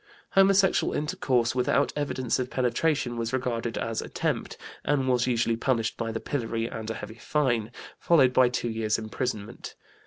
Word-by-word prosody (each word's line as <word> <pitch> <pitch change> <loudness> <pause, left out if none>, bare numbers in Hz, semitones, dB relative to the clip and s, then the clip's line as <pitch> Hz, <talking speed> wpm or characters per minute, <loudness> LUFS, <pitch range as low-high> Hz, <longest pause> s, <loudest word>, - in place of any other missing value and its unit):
Homosexual 195 0 +4
intercourse, 125 -6 0
without 130 +3 +1
evidence 130 -4 -1
of 125 0 -2
penetration, 130 0 0
was 115 0 -2
regarded 120 -3 -2
as 115 -1 -2
"attempt" - - -3 0.3
and 140 -3 +1
was 125 -1 +2
usually 115 -2 +1
punished 115 -1 0
by 115 -1 -3
the 110 - -3
pillory 115 -5 -2
and 110 -1 -5
a 115 - -3
heavy 110 +1 -8
fine, 120 -8 0 0.3
followed 135 -7 +4
by 130 -1 +5
two 120 -1 -2
years' 110 -1 0
imprisonment. 110 0 -5
120 Hz, 155 wpm, -27 LUFS, 115-130 Hz, 0.3 s, by